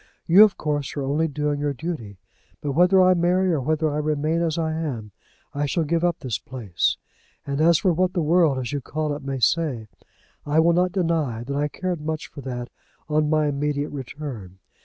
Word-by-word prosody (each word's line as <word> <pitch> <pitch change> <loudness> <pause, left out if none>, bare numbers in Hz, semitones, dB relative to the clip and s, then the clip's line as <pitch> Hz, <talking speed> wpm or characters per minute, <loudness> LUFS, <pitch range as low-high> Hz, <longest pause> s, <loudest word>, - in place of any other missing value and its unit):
"You, 185 +6 +8
of 210 -2 +3
course, 145 -2 -2
are 140 - -1
only 145 +4 +1
doing 150 0 -2
your 145 -1 -1
duty. 120 - -5 0.4
But 145 - -3
whether 180 +6 +4
I 185 0 +6
marry 180 +1 +2
or 150 - 0
whether 155 +4 0
I 150 - -1
remain 155 +2 0
as 165 -2 0
I 160 -1 -1
am, 130 -10 -4 0.4
I 145 +1 -1
shall 165 +4 0
give 165 +2 0
up 175 -1 0
this 115 -7 -3
place. 110 -7 -2 0.5
And 140 +1 -2
as 165 0 +5
for 180 +1 +2
what 185 +2 +1
the 175 - 0
world, 160 -3 +3
as 125 0 -4
you 145 - -2
call 150 +2 -2
it, 145 - -8
may 135 -1 -3
say, 125 -3 0 0.5
I 150 +2 +1
will 170 +1 +4
not 180 +1 +2
deny 165 - -1
that 140 +3 -4
I 145 +1 +1
cared 180 +1 -4
much 155 0 -4
for 140 - -9
that 125 -2 -5 0.4
on 150 0 +2
my 155 -1 +2
immediate 145 0 -1
return. 130 -9 -7
150 Hz, 205 wpm, -23 LUFS, 140-165 Hz, 0.5 s, You